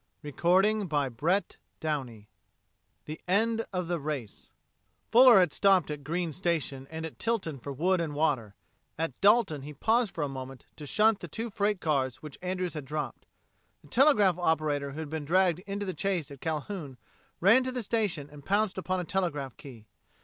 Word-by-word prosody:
CHAPTER 145 - -9
FOURTEEN 195 +4 +3 2.2
THE 155 +1 -7
END 225 +4 +2
OF 180 -3 -2
THE 175 -1 -1
RACE 140 -8 -6 0.6
Fuller 245 -1 +8
had 180 -5 +3
stopped 190 -6 +3
at 145 -1 -6
Green's 165 +1 -2
Station 155 -7 -2
and 160 0 -5
at 160 - -9
Tilton 195 - -2
for 140 - -6
wood 175 +6 +1
and 155 -3 -3
water; 135 -10 0 0.4
at 160 -5 -3
Dalton 200 - +4
he 150 +2 -9
paused 225 - +1
for 160 - -1
a - - 0
moment 135 -1 -8
to 150 - -8
shunt 215 +5 +3
the 175 - -7
two 225 +8 -5
freight 205 -1 0
cars 135 -5 0
which 150 -3 -9
Andrews 185 -1 -2
had 150 -3 -6
dropped. 150 -2 -5 0.6
The 145 - -18
telegraph 210 - +4
operator 150 -4 0
who 155 - -7
had 155 - -6
been 160 -1 -3
dragged 180 +2 +2
into 200 +1 -3
the 185 - -3
chase 180 -7 -2
at 140 - -11
Calhoun 155 -3 -4 0.4
ran 215 +8 +6
to 255 0 -2
the 250 -2 -3
station 200 -10 -1
and 145 -1 -12
pounced 200 +2 +1
upon 185 0 -1
a - - -2
telegraph 155 -8 -2
key. 120 -6 -12
170 Hz, 175 wpm, -29 LUFS, 145-200 Hz, 2.2 s, Fuller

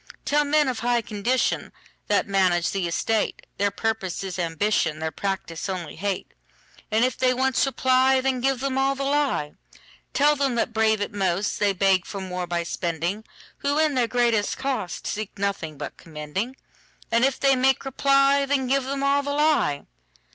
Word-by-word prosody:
Tell 295 +1 +3
men 295 0 +2
of 255 -3 -2
high 240 -1 +1
condition, 220 +5 -1 0.4
That 205 - +2
manage 185 -3 +2
the 190 -3 -1
estate, 215 +6 -1
Their 200 0 +2
purpose 210 -4 -2
is 190 -1 -5
ambition, 165 -1 0
Their 160 0 -3
practice 190 0 -4
only 180 -5 -4
hate:And 205 +4 -4
if 255 - -1
they 255 -1 +2
once 265 +1 +2
reply, 260 0 +3
Then 260 -1 0
give 265 -1 +1
them 270 -1 -1
all 270 +1 +2
the 275 - -3
lie. 275 - 0 0.6
Tell 295 +1 +4
them 275 -3 0
that 235 0 -1
brave 220 -1 +2
it 205 - -3
most, 195 0 0
They 205 -1 +3
beg 190 -1 +2
for 200 - -5
more 180 -1 -4
by 170 0 -1
spending, 170 +5 -3 0.3
Who, 285 +1 -1
in 310 -1 +3
their 250 -3 +2
greatest 235 -4 +1
cost, 265 -9 -3
Seek 215 0 -4
nothing 195 -6 -3
but - - -7
commending:And 190 - -5
if 270 0 +2
they 275 -1 +4
make 265 +1 +2
reply, 275 +1 +3
Then 270 -1 +1
give 270 +1 +1
them 275 +1 -3
all 280 +1 +3
the 285 - -5
lie. 290 - +1
230 Hz, 170 wpm, -24 LUFS, 190-270 Hz, 0.6 s, Tell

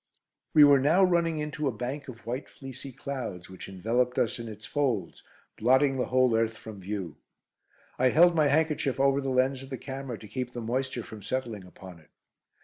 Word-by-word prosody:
We 150 - +9
were 145 -1 +7
now 160 +8 +4
running 170 -3 +2
into 150 -1 -2
a - - +1
bank 130 +6 -5
of 120 -4 -11
white 125 +4 -4
fleecy 135 0 -9
clouds, 120 -10 -6
which 95 - -9
enveloped 115 +6 0
us 115 - 0
in 115 - -6
its 110 -1 -9
folds, 130 -9 -1 0.4
blotting 130 +4 +4
the 125 - 0
whole 130 -2 +3
earth 115 0 0
from 110 -3 -10
view. 95 -5 -5 0.8
I 130 0 +5
held 175 +5 +6
my 155 -3 +3
handkerchief 150 -2 +1
over 135 0 +3
the 135 - -2
lens 130 +1 +1
of 135 - -10
the 130 - -4
camera 135 -3 -6
to 105 - -12
keep 125 +3 -4
the 120 - -5
moisture 125 +1 -2
from 110 -1 -10
settling 110 -2 -4
upon 90 -1 -12
it. 75 - -23
130 Hz, 195 wpm, -28 LUFS, 110-140 Hz, 0.8 s, We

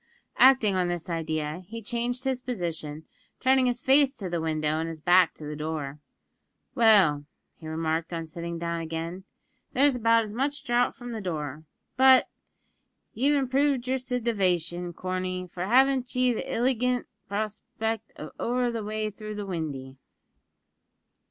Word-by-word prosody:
Acting 260 -6 +6
on 185 -1 +1
this 175 0 -3
idea, 155 0 -2
he 230 +3 -6
changed 240 +3 -3
his 260 -2 -1
position, 165 -10 -4 0.3
turning 260 0 +4
his 245 0 0
face 270 +2 +4
to 190 -6 -5
the 170 -2 -1
window 155 -1 0
and 165 - -2
his 165 -1 -6
back 175 +1 +4
to - - -11
the 150 0 -5
door. 150 -2 -4 0.7
"Well," 200 - +5 0.3
he 160 - -9
remarked 160 +1 -2
on 165 -1 -3
sitting 170 +1 -5
down 170 0 -3
again, 165 +3 -5 0.5
"there's 275 +1 +4
about 230 -1 +4
as 210 -1 -7
much 280 +5 -2
draught 245 -2 +1
from 245 -2 -7
the 225 -2 -4
door; 155 -4 -4 0.3
but, 260 0 +7
sure, - - -30 0.8
ye've 280 +5 +2
improved 270 -1 +1
yer 260 +1 +1
sitivation, 185 -9 -1
Corney, 185 +1 -3
for 180 +1 -3
haven't 260 +2 +3
ye 250 -1 +3
the - - -4
illigant 250 0 +1 0.2
prospect 220 +2 -3
of - - -8
over 245 0 0
the 230 -2 -4
way 215 0 -2
through 215 +1 -7
the 205 -1 -4
windy?" 145 -7 -5
205 Hz, 155 wpm, -27 LUFS, 165-245 Hz, 0.8 s, but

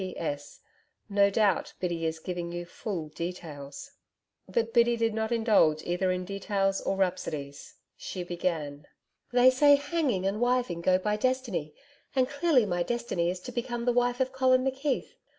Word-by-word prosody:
P.S. 145 -6 -5 0.5
No 200 0 +4
doubt, 205 -1 +1
Biddy 170 -2 -1
is 160 0 -3
giving 175 +1 -5
you 175 0 -5
full 170 -3 -5
details.' 150 -4 -7 0.6
But 225 +4 0
Biddy 235 0 +4
did 230 -1 +1
not 220 +1 -2
indulge 210 -10 +3
either 180 +2 0
in 180 0 -2
details 195 0 -1
or 195 - -1
rhapsodies. 150 -7 -3 0.2
She 180 - -5
began: 160 -5 -3 0.4
'They 250 +1 +6
say 285 +2 +6
hanging 285 - -1
and 200 +3 -1
wiving 245 -8 +1
go 185 +1 +4
by 210 +3 -1
destiny, 225 - -1 0.4
and 255 -1 +3
clearly 285 -3 +3
my 175 -3 -1
destiny 205 -5 -1
is 180 +1 -3
to 250 - -7
become 240 -1 -3
the 245 - +3
wife 245 +1 +1
of 260 0 +1
Collin 255 -1 +3
McKeith. 270 +1 -1
200 Hz, 160 wpm, -28 LUFS, 175-245 Hz, 0.6 s, They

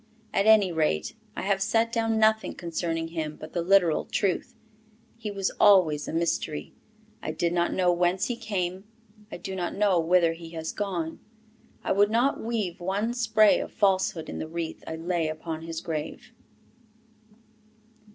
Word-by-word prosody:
At 200 - +2
any 210 -4 +6
rate, 155 - 0 0.2
I - - -4
have 195 0 +1
set 225 +3 +2
down 225 -1 +1
nothing 220 0 +2
concerning 165 -1 -3
him 155 -2 -4
but 155 - -11
the 175 - 0
literal 175 -2 +3
truth. 195 -4 -1 0.6
He 225 -2 -6
was 195 -2 -1
always 160 -7 +5
a - - -3
mystery. 165 -2 -2 0.5
I - - -4
did 170 0 -1
not 175 0 +1
know 180 -1 +2
whence 180 +3 +1
he 245 - -2
came; 190 -4 -3 0.5
I - - -5
do 190 -3 -6
not 175 -2 -3
know 200 -3 +3
whither 165 0 +3
he 165 0 -10
has 160 0 -3
gone. 175 -6 -3 0.6
I - - -1
would 205 +1 +4
not 240 +5 +1
weave 220 -6 -2
one 200 +6 -1
spray 220 -3 +4
of - - -5
falsehood 190 -5 +1
in - - -6
the - - -4
wreath 165 0 -5
I 160 - -4
lay 165 0 -1
upon 155 +1 -5
his 165 0 -5
grave. 155 -2 -5
180 Hz, 165 wpm, -27 LUFS, 165-205 Hz, 0.6 s, any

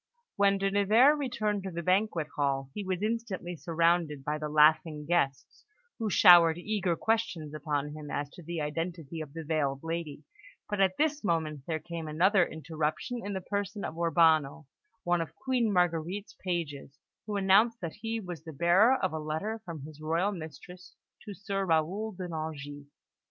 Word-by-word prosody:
When 200 0 +3
De 195 0 0
Nevers 215 +9 +5
returned 215 -7 -1
to 190 - -5
the 170 -1 -5
banquet 185 -2 +1
hall, 135 -2 -1
he 210 - -4
was 185 0 -3
instantly 215 -6 -3
surrounded 165 -3 0
by 150 +1 -1
the 150 0 -4
laughing 150 0 +3
guests, 145 -5 -1 0.4
who 220 -2 -1
showered 170 -3 +7
eager 190 -2 -1
questions 190 -9 -1
upon 150 -1 -2
him 150 -1 -8
as 145 0 -2
to - - -12
the 170 0 -4
identity 165 +1 -4
of 150 -3 -8
the 165 0 -6
veiled 145 -3 -1
lady; 165 -3 -4 0.4
but 205 -1 -1
at 190 -1 +2
this 300 -2 0
moment 155 -6 -1
there 160 -2 -1
came 165 0 -7
another 180 +5 +3
interruption 160 - -3
in 200 - -4
the 190 - -3
person 200 +2 -3
of - - -5
Urbano, 160 -3 +2 0.4
one 175 -1 +1
of 165 - -6
Queen 250 -4 0
Marguerite's 180 +2 0
pages, 150 -6 -4 0.3
who 210 - -3
announced 205 +4 +4
that 165 -3 -4
he 225 +1 -4
was 180 -6 -7
the 160 -1 -9
bearer 175 - +4
of 185 -9 -1
a 160 - -2
letter 160 +9 -3
from 165 -6 -7
his 155 0 -11
royal 165 +6 0
mistress 175 +1 -10 0.3
to 205 - -7
Sir 195 +1 -3
Raoul 185 +6 0
de 185 -1 -6
Nangis. 145 -3 -6
170 Hz, 170 wpm, -29 LUFS, 155-200 Hz, 0.4 s, showered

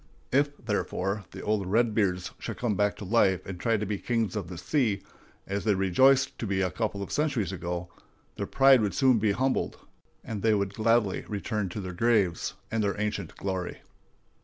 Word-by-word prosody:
If, 145 +2 +2
therefore, 100 -2 -2
the - - -9
old 105 -3 0
"Redbeards" 100 -4 +1
should - - -5
come 120 -3 0
back 105 +1 +1
to 105 - -8
life 95 -3 +2
and 95 -2 -6
try 115 +1 +2
to 105 - -2
be 105 -1 -3
kings 115 -5 -1
of 100 -5 -3
the 90 0 -7
sea, 105 - 0 0.4
as 100 +1 -3
they 105 -2 +2
rejoiced 130 +9 +3
to 115 - -3
be 95 -1 0
a 90 - 0
couple 100 +1 -2
of - - -8
centuries 135 - 0
ago, 90 -1 -4 0.5
their - - -4
pride 135 -2 +6
would 105 -2 -1
soon 130 -4 +4
be 105 -1 +2
humbled, 130 +4 0 0.5
and 105 -3 -5
they 110 0 +3
would 100 -1 -1
gladly 110 -2 +2
return 105 -1 -2
to 95 - -5
their 95 -2 -5
graves 100 -4 +1 0.2
and 110 -1 0
their 100 0 -1
ancient 105 0 -3
glory. 95 -2 -4
105 Hz, 190 wpm, -28 LUFS, 95-115 Hz, 0.5 s, pride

